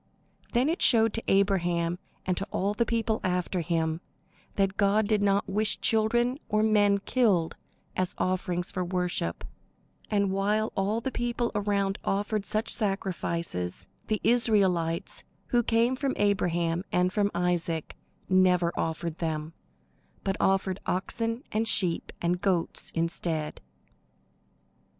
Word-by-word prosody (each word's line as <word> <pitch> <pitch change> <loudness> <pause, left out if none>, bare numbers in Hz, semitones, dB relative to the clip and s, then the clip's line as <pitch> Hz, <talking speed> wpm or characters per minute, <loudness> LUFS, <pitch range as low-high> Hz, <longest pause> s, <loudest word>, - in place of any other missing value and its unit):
Then 250 +3 +3
it 330 +3 -1
showed 225 -3 +5
to 225 - -2
Abraham 175 -3 +2 0.3
and 185 - +1
to 195 +3 -3
all 200 +2 0
the 235 +2 0
people 225 -2 0
after 180 0 0
him, 165 -1 -1 0.5
that 195 -1 +1
God 205 +1 +3
did 215 -1 +2
not 200 0 +2
wish 210 +2 +1
children 240 +4 +2
or 215 0 +2
men 205 -2 +4
killed 200 -6 +1 0.4
as 185 -1 -1
offerings 180 -1 -1
for 185 -2 -2
worship; 180 - -2 0.7
and 200 -2 +1
while 210 +3 0
all 205 +4 0
the 265 - -3
people 240 -1 -1
around 200 -1 0
offered 205 +1 -1
such 215 +2 -1
sacrifices, 170 - -2 0.2
the 215 -1 0
Israelites, 190 -8 +1 0.3
who 240 - +3
came 235 +2 +2
from 270 0 -1
Abraham 175 -4 +1
and 180 +1 +2
from 205 -1 +2
Isaac, 175 -2 -1 0.3
never 180 -2 +3
offered 165 0 -3
them, 160 -1 -3 0.7
but 195 - 0
offered 190 0 +1
oxen 230 +6 -2
and 220 +1 0
sheep 180 -5 0
and 175 +1 +1
goats 180 -4 +1
instead. 165 -2 -2
195 Hz, 130 wpm, -28 LUFS, 175-215 Hz, 0.7 s, showed